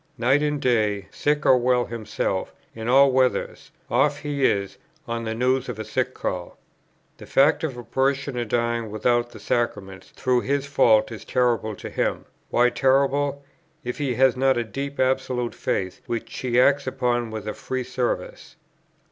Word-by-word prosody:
Night 130 +5 +3
and 150 -1 0
day, 105 -6 +1
sick 150 +1 0
or 130 - +6
well 125 0 +2
himself, 115 -3 -3 0.2
in 110 0 -6
all 135 +2 +6
weathers, 130 0 0 0.2
off - - +2
he 145 -2 -3
is, 100 -1 0 0.3
on 115 0 -3
the 110 0 -3
news 130 +2 +1
of 120 - -5
a 110 - -5
sick 130 0 -2
call. 90 -1 -4 0.6
The - - -12
fact 145 +4 +3
of 135 -6 -3
a 120 - -7
parishioner 135 -1 -1
dying 115 0 -1
without 120 +3 +1
the 115 -3 -12
Sacraments 95 -4 -3
through 125 -1 0
his 140 +1 -1
fault 115 -6 +3
is 110 -3 -8
terrible 120 -4 0
to - - -8
him; - - -1 0.2
why 125 0 +3
terrible, 140 +2 +1 0.4
if 125 +2 -5
he 135 -4 -1
has 130 +1 +4
not 135 0 +2
a 120 - +1
deep 140 +5 -6
absolute 130 -2 0
faith, 95 -1 -3
which 115 -1 -4
he 125 -1 +1
acts 140 +1 +3
upon 120 -2 0
with 110 -1 -6
a 105 - -2
free 130 -1 -4
service? 125 -1 -4
125 Hz, 170 wpm, -24 LUFS, 115-135 Hz, 0.6 s, or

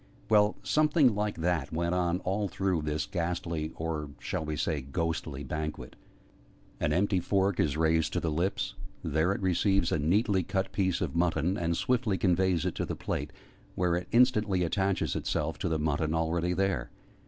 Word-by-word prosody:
Well, 105 -1 +4
something 150 -4 +4
like 105 0 -1
that 85 -4 0
went 85 +2 -1
on 90 0 0
all 100 +2 -1
through 95 -3 0
this 75 +2 -2
ghastly 85 -4 -2
or 80 -2 -3
shall - - -3
we 75 0 -3
say 75 +1 -1
'ghostly'? 75 0 -3
banquet. 75 -2 -5 0.8
An - - 0
empty 95 +1 +2
fork 95 +1 +1
is 75 -1 +1
raised 80 0 +2
to - - +1
the 80 - -1
lips: 85 +6 -1 0.3
there 80 +5 +1
it 100 - -2
receives 95 0 +2
a - - +1
neatly 95 +6 +2
cut 95 +2 -2
piece 95 -3 0
of - - -2
mutton, 85 +1 +1
and 85 -3 -1
swiftly 120 -6 +1
conveys 90 -2 +2
it - - 0
to - - -1
the - - -3
plate, - - -3 0.4
where 90 -2 +1
it 90 +1 -3
instantly 110 -7 +3
attaches 95 +3 0
itself 80 +2 -2
to 90 - -1
the 80 - +1
mutton 80 +1 0
already 85 +2 0
there. 95 +2 0
85 Hz, 175 wpm, -29 LUFS, 80-95 Hz, 0.8 s, Well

